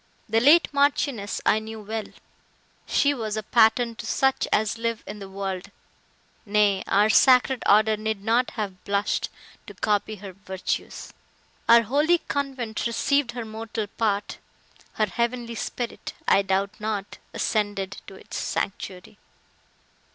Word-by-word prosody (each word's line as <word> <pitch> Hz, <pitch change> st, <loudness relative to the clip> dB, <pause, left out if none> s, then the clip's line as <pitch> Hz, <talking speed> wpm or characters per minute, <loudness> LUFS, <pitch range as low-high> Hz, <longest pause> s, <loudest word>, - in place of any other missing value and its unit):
The 225 Hz, +1 st, +2 dB
late 295 Hz, +8 st, +6 dB
Marchioness 280 Hz, -7 st, +1 dB
I 215 Hz, -, +4 dB
knew 220 Hz, 0 st, -8 dB
well; 215 Hz, +1 st, -4 dB, 0.8 s
she 285 Hz, 0 st, +3 dB
was 220 Hz, -5 st, -3 dB
a 215 Hz, -, -2 dB
pattern 230 Hz, +2 st, +3 dB
to -, -, -7 dB
such 265 Hz, 0 st, +1 dB
as 220 Hz, +1 st, +1 dB
live 230 Hz, -1 st, -2 dB
in 210 Hz, -, -7 dB
the 195 Hz, -1 st, -8 dB
world; 195 Hz, 0 st, -4 dB, 0.7 s
nay, 205 Hz, -2 st, +2 dB
our 205 Hz, +2 st, +4 dB
sacred 255 Hz, +2 st, +5 dB
order 215 Hz, +1 st, +5 dB
need 215 Hz, -1 st, -3 dB
not 235 Hz, +3 st, +2 dB
have 195 Hz, -4 st, -4 dB
blushed 200 Hz, 0 st, 0 dB, 0.4 s
to -, -, -10 dB
copy 210 Hz, 0 st, 0 dB
her 195 Hz, -1 st, -9 dB
virtues! 190 Hz, 0 st, -5 dB, 0.6 s
Our 235 Hz, 0 st, +8 dB
holy 295 Hz, +9 st, +3 dB
convent 265 Hz, -8 st, -3 dB
received 255 Hz, +2 st, +1 dB
her 240 Hz, -2 st, -5 dB
mortal 220 Hz, 0 st, -4 dB
part; 205 Hz, -1 st, -2 dB, 0.5 s
her 215 Hz, -, +1 dB
heavenly 235 Hz, +3 st, -2 dB
spirit, 235 Hz, +1 st, -5 dB
I 195 Hz, -, +5 dB
doubt 195 Hz, +1 st, -1 dB
not, 210 Hz, -2 st, -4 dB
ascended 205 Hz, -2 st, -1 dB
to 195 Hz, -, -10 dB
its -, -, -8 dB
sanctuary!" 190 Hz, 0 st, -4 dB
220 Hz, 135 wpm, -25 LUFS, 200-235 Hz, 0.8 s, Our